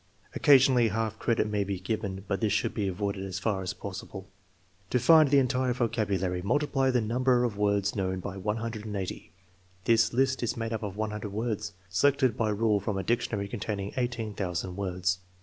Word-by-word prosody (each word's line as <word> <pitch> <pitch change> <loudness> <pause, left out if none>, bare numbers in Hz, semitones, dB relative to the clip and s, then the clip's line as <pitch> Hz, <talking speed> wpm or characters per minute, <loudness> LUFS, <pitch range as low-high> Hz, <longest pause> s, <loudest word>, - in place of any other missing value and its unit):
Occasionally 130 -4 +5
half 110 0 -2
credit 115 -2 +1
may 105 -1 0
be 100 -1 -3
given, 95 -1 -3
but 100 +2 -1
this 110 -2 +1
should 105 - 0
be 100 -2 -1
avoided 100 +1 -2
as 95 -1 -4
far 100 0 -1
as 95 0 -4
possible. 95 -1 -7 0.6
To - - +2
find 155 +3 +6
the 140 - +5
entire 130 -1 +2
vocabulary, 100 -7 -1
multiply 135 +5 +1
the 125 -2 +2
number 125 +3 +2
of 120 -4 -1
words 100 -1 +1
known 95 -2 -1
by 95 +1 -6
180. 105 -1 -4 0.5
(This 115 -1 +4
list 130 +1 +1
is 120 - -1
made 115 0 -3
up 110 - -3
of 105 -2 -5
100 105 -1 -3
words 105 -1 -3
selected 130 +6 +2
by 110 -2 0
rule 105 0 +2
from 100 0 -3
a 95 - -2
dictionary 110 -3 -1
containing 100 -2 -4
18,000 105 -8 -3
words.) 90 -1 -1
105 Hz, 175 wpm, -28 LUFS, 100-120 Hz, 0.6 s, find